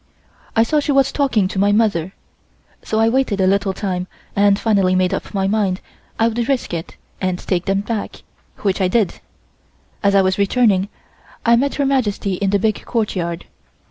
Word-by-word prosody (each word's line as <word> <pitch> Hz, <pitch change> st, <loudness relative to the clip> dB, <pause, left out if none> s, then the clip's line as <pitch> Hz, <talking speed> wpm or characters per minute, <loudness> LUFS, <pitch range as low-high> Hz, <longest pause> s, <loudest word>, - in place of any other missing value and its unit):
I 225 Hz, -, +5 dB
saw 300 Hz, +6 st, +1 dB
she 290 Hz, 0 st, -1 dB
was 275 Hz, -1 st, +3 dB
talking 250 Hz, -9 st, +1 dB
to 190 Hz, -, -4 dB
my 200 Hz, +1 st, +3 dB
mother, 200 Hz, -5 st, +1 dB, 0.7 s
so 220 Hz, -, -2 dB
I 225 Hz, -, +4 dB
waited 240 Hz, -4 st, +1 dB
a 190 Hz, -, +3 dB
little 195 Hz, +1 st, +2 dB
time 185 Hz, -2 st, -3 dB, 0.3 s
and 200 Hz, 0 st, +4 dB
finally 195 Hz, -4 st, +2 dB
made 185 Hz, 0 st, +1 dB
up -, -, -4 dB
my 195 Hz, -2 st, -1 dB
mind 195 Hz, -3 st, 0 dB, 0.4 s
I 225 Hz, -, +3 dB
would 235 Hz, +2 st, -2 dB
risk 265 Hz, -9 st, -1 dB
it 165 Hz, -1 st, -5 dB, 0.3 s
and 185 Hz, -1 st, 0 dB
take 180 Hz, -1 st, -2 dB
them 195 Hz, 0 st, +1 dB
back, 215 Hz, 0 st, -5 dB, 0.4 s
which 195 Hz, -1 st, 0 dB
I 185 Hz, -, +3 dB
did. 200 Hz, 0 st, 0 dB, 0.8 s
As 200 Hz, -1 st, +2 dB
I 195 Hz, -, +5 dB
was 190 Hz, +1 st, 0 dB
returning 200 Hz, -2 st, +2 dB, 0.6 s
I 235 Hz, 0 st, +6 dB
met 275 Hz, +4 st, 0 dB
Her 285 Hz, -, 0 dB
Majesty 215 Hz, -7 st, 0 dB
in 195 Hz, +2 st, -1 dB
the 200 Hz, -, +3 dB
big 215 Hz, +1 st, -1 dB
courtyard. 180 Hz, -7 st, -2 dB
200 Hz, 185 wpm, -19 LUFS, 190-230 Hz, 0.8 s, I